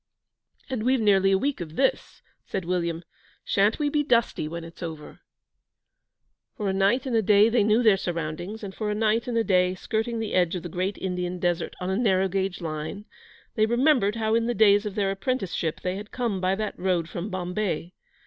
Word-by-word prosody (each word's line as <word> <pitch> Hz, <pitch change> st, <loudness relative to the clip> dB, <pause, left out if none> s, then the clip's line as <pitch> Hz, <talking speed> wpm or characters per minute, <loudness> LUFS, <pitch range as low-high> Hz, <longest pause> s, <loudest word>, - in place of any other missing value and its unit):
'And 260 Hz, -5 st, -3 dB
we've 255 Hz, +3 st, +2 dB
nearly 195 Hz, -3 st, +4 dB
a 195 Hz, -, +4 dB
week 270 Hz, -1 st, -2 dB
of 160 Hz, -2 st, -7 dB
this,' 270 Hz, -, -1 dB, 0.2 s
said 190 Hz, -3 st, -4 dB
William. 170 Hz, -1 st, -1 dB, 0.4 s
'Sha'n't 205 Hz, +2 st, +2 dB
we 295 Hz, -, 0 dB
be 295 Hz, +1 st, +1 dB
dusty 235 Hz, -, +1 dB
when 170 Hz, +1 st, -6 dB
it's 165 Hz, 0 st, -12 dB
over?' 160 Hz, -3 st, -7 dB, 1.4 s
For 210 Hz, -, -2 dB
a 190 Hz, -, +1 dB
night 200 Hz, +7 st, +2 dB
and 255 Hz, -3 st, -1 dB
a 225 Hz, -, +4 dB
day 210 Hz, +1 st, +5 dB
they 230 Hz, -2 st, +3 dB
knew 215 Hz, +3 st, +3 dB
their 215 Hz, -4 st, +5 dB
surroundings; 175 Hz, +4 st, -4 dB
and 195 Hz, -1 st, -6 dB
for 215 Hz, +1 st, -3 dB
a 210 Hz, -, -1 dB
night 220 Hz, +2 st, +1 dB
and 240 Hz, -2 st, -1 dB
a 230 Hz, -, +3 dB
day, 180 Hz, -3 st, +2 dB
skirting 225 Hz, +4 st, -2 dB
the 220 Hz, -2 st, -3 dB
edge 180 Hz, -1 st, +2 dB
of 175 Hz, -, -5 dB
the 175 Hz, -, -5 dB
great 185 Hz, +4 st, -2 dB
Indian 180 Hz, -1 st, -3 dB
Desert 175 Hz, -1 st, -1 dB
on 185 Hz, +1 st, -2 dB
a -, -, 0 dB
narrow 195 Hz, -5 st, +2 dB
gauge 190 Hz, -1 st, -2 dB
line, 160 Hz, +5 st, -5 dB, 0.5 s
they 215 Hz, -1 st, +2 dB
remembered 240 Hz, -3 st, +3 dB
how 220 Hz, -1 st, 0 dB
in 230 Hz, 0 st, +2 dB
the 240 Hz, -, -1 dB
days 205 Hz, -1 st, +5 dB
of 205 Hz, -, -6 dB
their 200 Hz, -2 st, +1 dB
apprenticeship 195 Hz, -6 st, -2 dB
they 185 Hz, +1 st, -2 dB
had 210 Hz, +1 st, -8 dB
come 230 Hz, -7 st, -2 dB
by 185 Hz, +1 st, +1 dB
that 215 Hz, +1 st, -4 dB
road 180 Hz, -3 st, 0 dB
from 175 Hz, +4 st, -5 dB
Bombay. 180 Hz, -1 st, -3 dB
195 Hz, 205 wpm, -26 LUFS, 180-220 Hz, 1.4 s, day